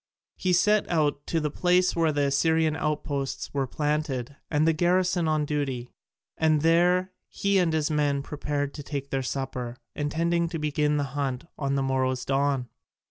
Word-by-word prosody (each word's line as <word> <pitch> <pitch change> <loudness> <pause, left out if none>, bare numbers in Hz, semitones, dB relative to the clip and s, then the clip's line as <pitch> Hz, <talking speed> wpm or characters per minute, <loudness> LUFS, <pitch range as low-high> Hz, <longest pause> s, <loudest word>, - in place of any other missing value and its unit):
He 185 - -1
set 210 +4 +3
out 150 -4 0
to 165 - +1
the 150 -2 -2
place 180 +3 +2
where 165 -2 +2
the 145 -1 0
Assyrian 160 +3 +2
outposts 145 -3 -3
were 135 -2 0
planted 145 -2 -2
and 155 +1 +2
a 165 - +4
garrison 175 +1 +2
on 155 -1 +1
duty, 135 -5 -2 0.5
and 155 -2 +3
there 180 +3 +3 0.2
he 200 -1 +1
and 175 -3 +2
his 155 -1 0
men 145 -2 +1
prepared 145 -1 -3
to 150 - -7
take 140 -1 -5
their 135 - 0
supper, 125 -2 -4 0.2
intending 165 +3 0
to 165 - -3
begin 150 -1 +1
the 145 - +1
hunt 135 -3 -2
with 140 -1 -1
the 135 - +1
morrow's 130 -1 0
dawn. 135 -2 +1
150 Hz, 170 wpm, -26 LUFS, 140-165 Hz, 0.5 s, a